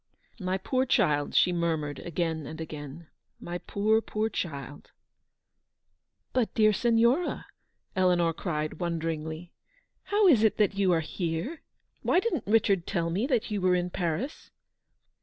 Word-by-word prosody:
"My 185 -1 -1
poor 255 +7 0
child!" 150 - +2
she 180 - +5
murmured 160 -4 -1
again 165 -3 -2
and 160 - -8
again. 155 0 -7 0.2
" - - -50
My 175 0 -3
poor, 215 +4 +1
poor 220 0 -2
child 145 - -5 0.7
!" - - -51
"But, 250 -4 +1
dear 215 -2 +5
Signora," 235 - +2 0.5
Eleanor 175 -3 +3
cried, 155 -3 -3
wonder 170 -2 -1
ingly, 160 +2 -5 0.2
' - - -36
' - - -48
how 415 0 +4
is 285 - +6
it 220 - +3
that 210 -2 +3
you 195 -2 +2
are 165 -2 +3
here? 170 - -3 0.4
Why 355 - +3
didn't 360 - -2
Richard 200 -5 +2
tell 170 -4 -1
me 205 +9 0
that 240 -5 0
you 205 -2 -1
were 180 0 +3
in 180 0 -1
Paris 175 - -3
180 Hz, 160 wpm, -28 LUFS, 165-220 Hz, 0.7 s, is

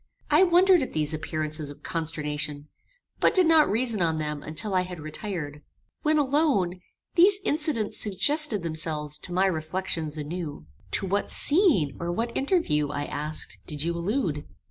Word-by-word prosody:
I - - +6
wondered 365 0 +5
at 260 - -4
these 155 0 -1
appearances 155 -1 -2
of 145 - -12
consternation, 150 -2 -2 0.5
but - - +3
did 370 -2 +6
not 320 -2 +5
reason 225 -2 0
on 165 -2 +1
them 150 -1 -3
until 160 +8 -4
I 185 - +3
had 180 -2 -6
retired. 155 -2 -6 0.4
When 310 0 +2
alone, 270 - +1 0.3
these 380 +3 +6
incidents 295 - -1
suggested 215 - +1
themselves 155 -2 -1
to 180 - -6
my 185 +2 +2
reflections 160 -2 -2
anew. 150 - -5 0.3
"To - - +2
what 200 +2 -1
scene, 290 - +3
or 170 0 -2
what 230 +6 -3
interview, 270 - +1
I 145 0 -3
asked, 150 +2 -4
did 150 -1 -2
you 170 +1 -1
allude? 170 - -2
175 Hz, 155 wpm, -26 LUFS, 155-255 Hz, 0.5 s, I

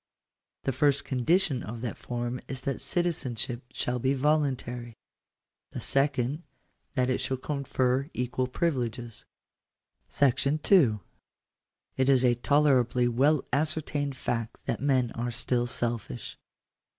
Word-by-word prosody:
The 135 - 0
first 140 +1 +2
condition 135 +2 +2
of 115 +2 -6
that 120 -2 -3
form 120 +1 -4
is 135 -1 -5
that 135 0 -3
citizenship 130 - -1
shall 125 0 -1
be 130 +3 +1
voluntary; 130 -5 0 0.8
the - - -4
second 135 +1 +1 0.3
— - - -45
that 125 -2 +2
it 130 - 0
shall 130 - -2
confer 135 -1 -1
equal 125 +1 -1
privileges. 125 -6 -2 0.9
M 140 -3 +6 1.6
It 130 +1 +2
is 130 -2 +5
a 120 - +5
tolerably 125 -2 +3
well 135 +5 +3
ascertained 145 -1 0
fact 115 -2 -3
that - - -2
men 130 -4 +2
are 120 +1 -3
still 120 +1 0
selfish. 115 - -3
130 Hz, 120 wpm, -28 LUFS, 120-140 Hz, 1.6 s, M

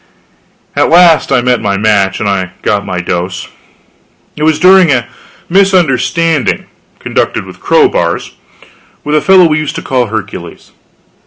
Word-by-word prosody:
At - - +1
last 170 -3 +4
I 125 -3 +2
met 125 -1 +1
my 100 -2 -1
match, 100 -2 +1
and 105 - -2
I 95 -2 -2
got 100 -1 -1
my 90 -2 -3
dose. 90 +1 -4 0.9
It - - -9
was 155 0 +2
during 185 -1 +5
a 125 -5 0 0.4
misunderstanding 165 -5 +1 0.3
conducted - - -2
with - - -13
crowbars - - 0 0.7
with 150 - -3
a 155 - +2
fellow 190 +1 +5
we 155 -1 +1
used 155 -2 -4
to - - -6
call 125 -3 -1
Hercules. 110 -3 -7
130 Hz, 145 wpm, -11 LUFS, 100-165 Hz, 0.9 s, during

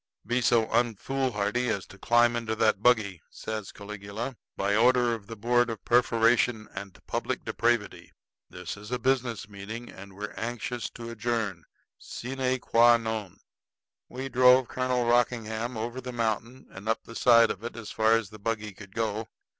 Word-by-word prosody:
"Be 120 +3 0
so 115 -2 +4
unfoolhardy 120 -1 0
as 100 -3 -1
to 100 - -15
climb 120 +2 +4
into 115 -2 -2
that 110 -3 +2
buggy," 105 -7 +3
says 110 -3 -6
Caligula, 105 +4 -6 0.2
"by 100 +1 +1
order 120 +1 +4
of 110 -3 -6
the 115 - -7
board 120 +3 +2
of 110 -4 -6
perforation 115 -1 +3
and 100 -2 -8
public - - -3
depravity. 115 +1 -1 0.4
This 90 +1 -7
is 105 +1 -10
a 125 - +1
business 125 -3 0
meeting, 105 +4 -8
and 100 0 -12
we're 105 +1 -6
anxious 120 +1 -4
to 115 0 -7
adjourn 110 -6 -2 0.3
sine 130 +1 -2
qua 120 0 +5
non." 110 -5 -5 0.7
We 130 +2 -5
drove 125 -1 +5
Colonel 125 -1 0
Rockingham 120 -1 0
over 120 +3 -4
the 125 0 -6
mountain 115 +2 -2
and 100 +3 -7
up 115 - 0
the 115 - -11
side 115 -1 +5
of 95 - -7
it 120 - -5
as 115 -3 -7
far 110 0 +3
as 115 -2 +1
the 110 - -11
buggy 105 0 -2
could 100 0 -13
go. 110 -1 -1
115 Hz, 165 wpm, -28 LUFS, 105-120 Hz, 0.7 s, qua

